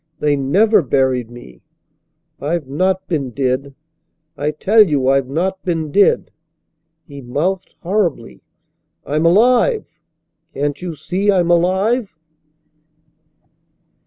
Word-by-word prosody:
They 145 -1 +1
never 195 +10 +3
buried 130 -4 0
me. 65 - -14 0.8
I've 150 0 -3
not 185 +7 -1
been 145 -7 -2
dead! 135 +2 -2 0.6
I 145 - -2
tell 195 +9 +3
you 145 -10 +2
I've 135 -1 +1
not 185 +6 -2
been 165 -4 -2
dead!" 205 - +2 0.8
He 140 -2 -10
mouthed 165 +10 -3
horribly. 175 - -2 0.6
"I'm 155 +3 +1
alive! 250 - +3 0.7
Can't 145 +2 -2
you 175 -3 -5
see 195 +6 -1
I'm 175 -3 +2
alive?" 190 +4 +1
165 Hz, 105 wpm, -18 LUFS, 140-190 Hz, 0.8 s, never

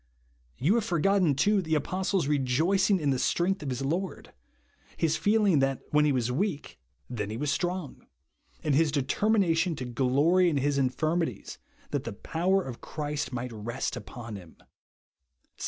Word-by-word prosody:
You 155 +10 +2
have 235 -1 +2
forgotten, 185 -4 +2
too, 205 +8 +3
the 160 -3 0
apostle's 185 +4 0
rejoicing 155 +9 +2
in 145 -3 +1
the 130 - 0
strength 185 +8 +1
of 145 - -4
his 130 +1 -3
Lord; 175 +7 -3 0.6
his 160 -1 +1
feeling 205 -6 +3
that 135 -1 0
when 150 0 +4
he 150 - +3
was 125 -2 0
weak 150 - -2 0.3
then 105 -5 -4
he 110 - -4
was 145 +2 -1
strong; 180 -5 -3 0.6
and 150 - +1
his 155 +2 +3
determination 165 +4 +1
to 130 - -5
glory 140 +9 +3
in 150 - 0
his 140 +1 +1
infirmities, 155 +6 -1 0.3
that 140 -2 -1
the 115 - -5
power 185 - 0
of 125 -6 -8
Christ 150 -1 -4
might 125 -1 -4
rest 115 +3 -4
upon 115 -4 -8
him, 90 -4 -14
(2 - - -24
Cor. 65 -3 -50
150 Hz, 165 wpm, -28 LUFS, 130-180 Hz, 0.6 s, when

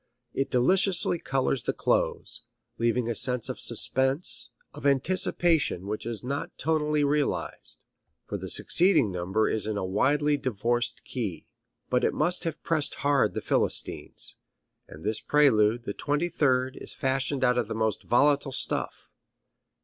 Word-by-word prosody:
It 135 - -2
deliciously 180 +7 +2
colors 135 -2 -1
the - - -2
close, - - -1 0.4
leaving 115 +1 0
a 120 - -1
sense 125 +1 +2
of - - -5
suspense, 135 +6 +4 0.2
of - - -11
anticipation 150 - +1
which 105 +2 -5
is 115 -1 -5
not 140 +3 -5
tonally 150 -2 0
realized, 145 0 -2 0.4
for - - -5
the - - -7
succeeding 175 - +3
number 95 +5 -1
is 110 -1 +1
in 110 -1 -2
a 95 - -2
widely 145 +10 +1
divorced 120 0 -2
key. 105 - -5 0.5
But 125 - +1
it - - 0
must 175 +4 0
have 165 -2 -5
pressed 155 -3 -1
hard 145 -1 +2
the - - -3
philistines. - - 0 0.5
And 80 - -13
this 110 0 -1
prelude, 120 -6 +2
the 100 - -5
twenty 150 +8 -2
third, 130 -5 0
is - - -6
fashioned 135 +1 -1
out 125 -1 +2
of 115 - -2
the 110 - -5
most 110 -1 -1
volatile 140 +2 +2
stuff. - - -1
130 Hz, 150 wpm, -26 LUFS, 115-150 Hz, 0.5 s, suspense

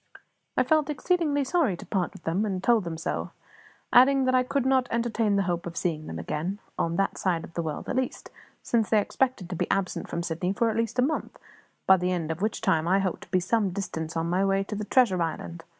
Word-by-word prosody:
I - - +5
felt 310 -2 +2
exceedingly 300 -1 +1
sorry 275 - +1
to - - -10
part 185 -4 -1
with - - -14
them, 170 +6 0
and 190 -3 -2
told 230 -4 +3
them 165 -1 -4
so; 160 - -3 0.6
adding 265 +1 +6
that 255 - +2
I 255 - +5
could 260 +1 -1
not 260 -1 +3
entertain 230 -3 +1
the 200 - +2
hope 175 -2 -2
of 170 - -7
seeing 155 -3 -2
them 80 - -5
again, 155 - -3 0.2
on 170 0 -1
that 195 +2 0
side 170 -4 0
of - - -11
the 170 - -1
world 155 -2 -5
at - - -2
least, 260 -1 -3 0.3
since 225 -3 +1
they 215 - +4
expected 250 -2 -1
to - - -2
be - - -2
absent 195 -2 -1
from 170 - -3
Sydney 175 +3 -1
for 230 +2 +1
at - - -4
least 230 +1 -1
a 250 - +4
month, 310 +4 -2 0.5
by 190 - +7
the 180 +1 -1
end 165 -3 -1
of 160 +3 -5
which 215 +2 -1
time 170 -6 +2
I 190 +2 +4
hoped 190 -3 -1
to - - -30
be 185 - +2
some 205 +2 +1
distance 175 -4 -4
on 165 0 0
my 180 +3 +1
way 195 0 +2
to 210 - -6
the 210 0 -4
treasure 210 -7 +3
island. 165 +1 -4
195 Hz, 245 wpm, -27 LUFS, 170-240 Hz, 0.6 s, by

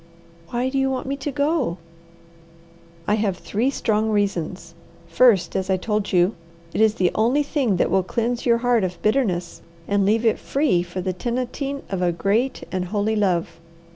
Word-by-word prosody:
"Why 245 +2 -1
do 270 +1 -1
you 270 0 +2
want 260 -1 -3
me 275 +1 -2
to 290 +1 -4
go?" 285 - 0 1.3
"I 205 - +2
have 205 -4 0
three 225 +8 -1
strong 220 -5 0
reasons: 195 -5 -2 0.3
First, 195 +3 +3
as 190 0 -1
I 190 - +3
told 210 +1 -2
you, 180 +3 +3 0.4
it - - 0
is 220 -1 +4
the 180 -4 +2
only 245 +7 +2
thing 275 - 0
that 175 - +1
will 190 - +4
cleanse 235 +6 -2
your 235 -2 +3
heart 240 -4 +3
of 180 -1 -3
bitterness 210 -7 0 0.3
and 200 0 +2
leave 220 +4 +2
it 225 - +2
free 275 - +1
for 175 +1 -5
the 185 0 -2
tenanting 255 - -3
of 190 -2 -2
a 175 -1 +2
great 210 +9 0
and 185 -1 -2
holy 205 +3 -1
love. 180 -6 0
215 Hz, 180 wpm, -22 LUFS, 185-245 Hz, 1.3 s, is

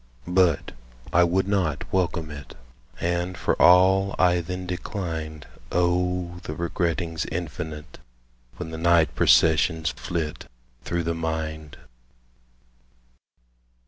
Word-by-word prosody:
But 90 -3 +2 0.4
I 90 - +6
would 95 +3 +1
not 90 -8 0
welcome 85 -4 0
it; 70 -2 -10 0.4
And 85 +1 -1
for - - +1
all 95 +2 +5
I 90 -1 +4
then 90 +2 -5
declined 85 -4 -5 0.3
O 90 0 0
the 80 -4 -6
regrettings 85 -1 -2
infinite 80 -2 -6 0.6
When 80 - -6
the 80 - -6
night 85 -2 +3
processions 80 0 +3
flit 80 +1 -5 0.3
Through 85 -1 -2
the 85 0 -1
mind! 80 -2 -4
85 Hz, 105 wpm, -25 LUFS, 80-90 Hz, 0.6 s, I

